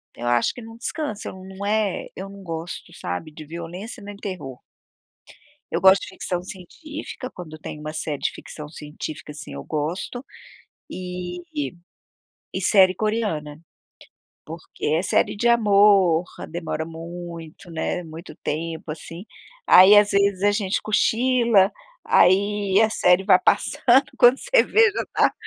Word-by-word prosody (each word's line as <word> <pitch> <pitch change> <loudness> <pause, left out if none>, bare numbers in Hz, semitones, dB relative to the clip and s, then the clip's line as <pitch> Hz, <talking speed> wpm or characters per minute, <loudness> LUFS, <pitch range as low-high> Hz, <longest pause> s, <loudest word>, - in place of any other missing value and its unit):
eu 120 - -5
acho 120 -1 +2
que 245 - -10
não 225 0 -11
descansa, 265 -4 -4
não 190 +1 -9
é 210 -2 0
eu 190 +1 -6
não 200 0 -12
gosto, 165 0 -6
sabe, 155 - -5
de 155 0 -11
violência 175 - -8
nem 205 0 -9
terror. 175 - -7 1.1
Eu - - 0
gosto 190 +1 +6
de - - -7
ficção 180 -1 -4
científica, 255 - -8
quando 155 -3 -10
tem 150 -1 -8
uma 155 0 -6
série 155 -2 -3
de - - 0
ficção 150 -1 -10
científica, 150 0 -8
assim, 150 +1 -9
eu - - -7
gosto, 165 - -4 0.7
e 180 - -6 1.1
e - - -3
série 190 -3 +5
coreana, 190 -10 -2 0.9
porque 165 +1 -8
é 155 +3 +2
série 190 - +1
de 235 +4 0
amor, 200 -6 +4 0.2
demora 160 -1 -4
muito, 170 +1 -9
né, 165 +2 -3
muito 160 0 -10
tempo 160 +1 -4
assim, 165 +4 -9 0.4
aí 190 +3 +9
às 205 0 +5
vezes 200 -1 +2
a 205 - +5
gente 205 -2 -1
cochila, 230 -2 +3 0.3
aí 200 +1 +3
a 220 - +4
série 185 -3 +3
vai - - +7
passando 260 +2 +3
quando 245 +2 +6
você - - +3
vê 450 +1 +4
já - - -3
tá - - +3
185 Hz, 145 wpm, -23 LUFS, 160-210 Hz, 1.1 s, aí